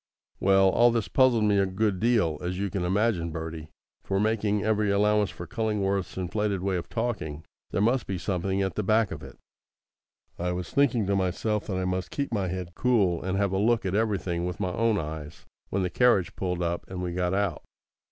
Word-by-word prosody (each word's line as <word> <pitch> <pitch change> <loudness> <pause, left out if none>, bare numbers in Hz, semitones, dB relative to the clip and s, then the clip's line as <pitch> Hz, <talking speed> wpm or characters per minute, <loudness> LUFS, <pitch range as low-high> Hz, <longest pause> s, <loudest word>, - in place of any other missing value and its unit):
Well, 95 0 +5
all 120 +5 +5
this 115 -5 0
puzzled 120 +3 +4
me 105 -1 +3
a 100 - +2
good 95 0 0
deal, 105 -10 +2
as 90 +1 -3
you 100 -1 -2
can 95 -1 -2
imagine, 95 -2 +1
Bertie; 80 -1 -6 0.3
for, 95 0 -1
making 105 -1 +1
every 105 -1 +1
allowance 105 0 +3
for 85 - -8
Cullingworth's 100 -2 -1
inflated 100 +1 -1
way 95 -1 0
of 85 - -6
talking, 105 -11 -3 0.2
there 100 - 0
must 120 +3 +1
be 95 - -2
something 95 +2 -1
at 95 - -2
the - - -1
back 110 0 +2
of - - -6
it. - - -11 1.0
I 90 +1 -1
was 90 -1 -5
thinking 130 -6 +2
to 100 +1 +1
myself 100 +3 -1
that 95 -3 -2
I 95 - -1
must 90 0 -2
keep 140 -4 -3
my 100 -4 0
head 90 -1 -5
cool, 100 -7 +2
and 95 +1 -2
have 100 -1 +1
a 95 - 0
look 115 +1 +2
at 95 - -1
everything 100 -5 0
with 90 0 -5
my 90 -3 -1
own 115 0 +2
eyes, 75 -1 -6 0.2
when 95 0 0
the 90 - -2
carriage 115 -5 +3
pulled 90 -2 -2
up 85 0 -2
and 90 -1 -5
we 90 -1 -3
got 90 +1 0
out. 100 -2 -1
95 Hz, 210 wpm, -27 LUFS, 90-105 Hz, 1.0 s, Well